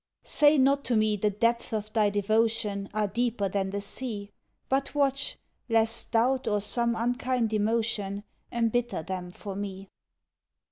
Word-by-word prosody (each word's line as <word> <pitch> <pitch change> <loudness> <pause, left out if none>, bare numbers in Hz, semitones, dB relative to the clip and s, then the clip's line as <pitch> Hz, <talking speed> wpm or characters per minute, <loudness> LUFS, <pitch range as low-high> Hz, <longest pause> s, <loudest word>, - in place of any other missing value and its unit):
Say 295 0 +4
not 275 +1 +3
to 245 - +1
me 215 -1 +3
the 210 +1 +1
depths 230 +3 0
of 215 -1 -3
thy 215 -2 +3
devotion 205 -1 0
Are 215 0 0
deeper 230 -1 0
than 195 0 -1
the 200 +1 -3
sea; 205 -1 -2 0.4
But 275 +2 0
watch, 275 -1 0 0.3
lest 225 0 +2
doubt 255 +3 +2
or 210 -1 +2
some 235 +3 0
unkind 245 0 0
emotion 210 -2 0 0.3
Embitter 235 -5 0
them 180 0 -5
for 195 +2 -7
me. 195 -1 -6
220 Hz, 145 wpm, -28 LUFS, 205-240 Hz, 0.4 s, Say